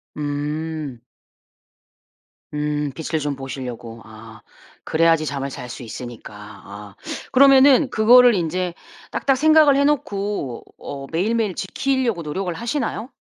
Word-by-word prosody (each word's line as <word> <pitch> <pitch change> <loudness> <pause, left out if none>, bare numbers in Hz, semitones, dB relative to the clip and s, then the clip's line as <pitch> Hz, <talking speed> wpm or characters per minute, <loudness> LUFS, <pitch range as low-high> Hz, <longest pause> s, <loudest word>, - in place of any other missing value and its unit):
음. 150 -2 -4 1.5
음 150 -1 -2
빛을 160 +1 -3
좀 145 -1 -2
보시려고 125 -4 -7
아. 110 0 -13 0.4
그래야지 165 -1 +2
잠을 140 -1 -3
잘 125 -2 -8
수 120 - -8
있으니까 120 -1 -9
아. 105 -1 -12 0.4
그러면은 270 +1 +6
그거를 240 +1 +6
인제 175 +1 -2 0.4
딱딱 270 -2 +1
생각을 310 -1 +5
해 280 +1 +3
놓고 205 - -2
어 135 -1 -8
매일매일 210 +3 0
지키려고 240 0 -1
노력을 175 +4 -3
하시나요? 235 - -3
160 Hz, 255 characters per minute, -21 LUFS, -, 1.5 s, 그러면은